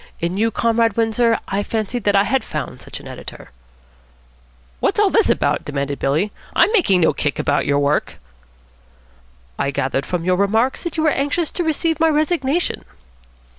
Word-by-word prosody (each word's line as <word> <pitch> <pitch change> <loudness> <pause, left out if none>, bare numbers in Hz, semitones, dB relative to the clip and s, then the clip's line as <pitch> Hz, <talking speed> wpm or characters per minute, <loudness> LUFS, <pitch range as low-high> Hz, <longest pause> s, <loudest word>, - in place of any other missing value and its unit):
In 170 +2 -2
you, 220 +3 +2
Comrade 230 -1 +1
Windsor, 230 0 +2
I 195 +1 -1
fancied 220 +2 -3
that 205 -1 +3
I 195 - +5
had 255 +6 0
found - - -6
such - - -8
an - - -12
editor." - - -10 1.3
"What's - - 0
all - - +4
this - - +3
about?" - - +1
demanded 140 -1 -3
Billy. 155 +10 0 0.2
"I'm - - +4
making 250 - +3
no 160 - +4
kick 145 -2 -2
about 145 -1 0
your 140 - +2
work." 145 +1 0 1.4
"I 140 - 0
gathered 135 0 -2
from 175 -2 -2
your 180 0 +2
remarks 220 +6 +1
that 345 -1 -5
you 315 - +1
were 315 - +4
anxious 290 +4 -1
to 350 - -2
receive 320 0 0
my 325 0 +4
resignation." 310 0 0
220 Hz, 170 wpm, -20 LUFS, 170-285 Hz, 1.4 s, I